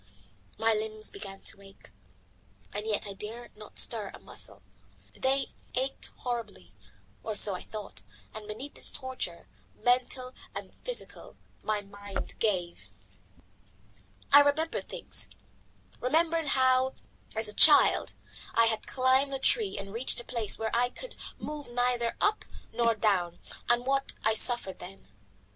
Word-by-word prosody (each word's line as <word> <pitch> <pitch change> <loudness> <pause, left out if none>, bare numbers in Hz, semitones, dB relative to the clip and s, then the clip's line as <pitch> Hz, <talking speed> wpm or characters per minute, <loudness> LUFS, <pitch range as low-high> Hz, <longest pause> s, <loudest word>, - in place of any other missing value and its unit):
My 225 +1 +2
limbs 215 0 -4
began 195 -1 -10
to 200 - -2
ache, 195 0 -18 0.8
and 210 +2 -5
yet 210 -2 -1
I 200 - -6
dared 225 +4 -8
not 210 0 -14
stir 215 -4 +5
a - - -11
muscle. - - -7 0.5
They 270 +1 0 0.3
ached 265 +2 -1
horribly, 225 - -6 0.5
or 220 - -4
so 205 -1 +7
I 180 - -6
thought, 210 - -9 0.3
and 215 -1 -9
beneath 255 +7 -7
this - - +5
torture, 260 -11 -6 0.3
mental 255 +1 0 0.2
and - - -7
physical, - - -6 0.2
my 215 -1 -2
mind 200 0 -7
gave. 175 - -2 1.4
I 285 - +11
remembered 290 +3 0
things: - - -4 0.7
remembered 325 +4 +1
how, 260 0 +3 0.4
as 220 0 +4
a 210 - -2
child, 300 +5 +8 0.4
I 230 - +5
had 225 -1 -2
climbed 260 +2 +1
a - - -1
tree 410 - +2
and 195 0 -7
reached 240 +2 +1
a - - -8
place 235 -4 0
whence 225 0 -3
I 245 +1 +2
could - - -9 0.2
move 300 -3 -7
neither 245 -1 -1
up 420 +1 +1 0.3
nor 230 -1 +2
down, 190 -5 0 0.3
and 240 +1 +2
what 275 0 0
I 220 - +3
suffered 220 -3 +5
then. 180 - -12
230 Hz, 140 wpm, -29 LUFS, 210-260 Hz, 1.4 s, I